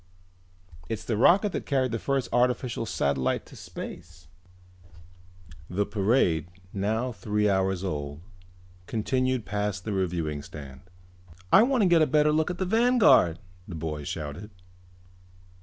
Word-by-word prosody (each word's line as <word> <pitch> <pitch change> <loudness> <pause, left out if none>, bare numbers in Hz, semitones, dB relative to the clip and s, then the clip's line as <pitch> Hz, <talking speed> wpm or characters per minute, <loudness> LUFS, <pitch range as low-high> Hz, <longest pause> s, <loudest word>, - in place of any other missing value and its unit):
"It's 110 -1 -3
the 115 - -1
rocket 190 - +4
that - - -5
carried 130 -3 +1
the 115 - -2
first 135 +1 -1
artificial 120 -1 +1
satellite 70 -6 0
into - - -16
space." 80 -2 -9 1.4
The 100 +3 0
parade, 95 - +1 0.3
now 110 +6 -1
three 105 0 -1
hours 95 -1 +1
old, 75 -4 -4 0.7
continued 130 +2 -1
past 105 -2 -3
the 105 - -2
reviewing 85 -6 -2
stand. 70 -3 -10 0.7
"I - - +9
wanna 245 -3 +3
get 170 -3 +5
a 155 - +4
better 150 +2 +3
look 155 +2 +1
at 180 - -4
the 185 - -1
Vanguard!" 220 - +4 0.3
the 90 - -7
boy 75 -2 -4
shouted. 80 +7 -6
105 Hz, 130 wpm, -27 LUFS, 85-130 Hz, 1.4 s, I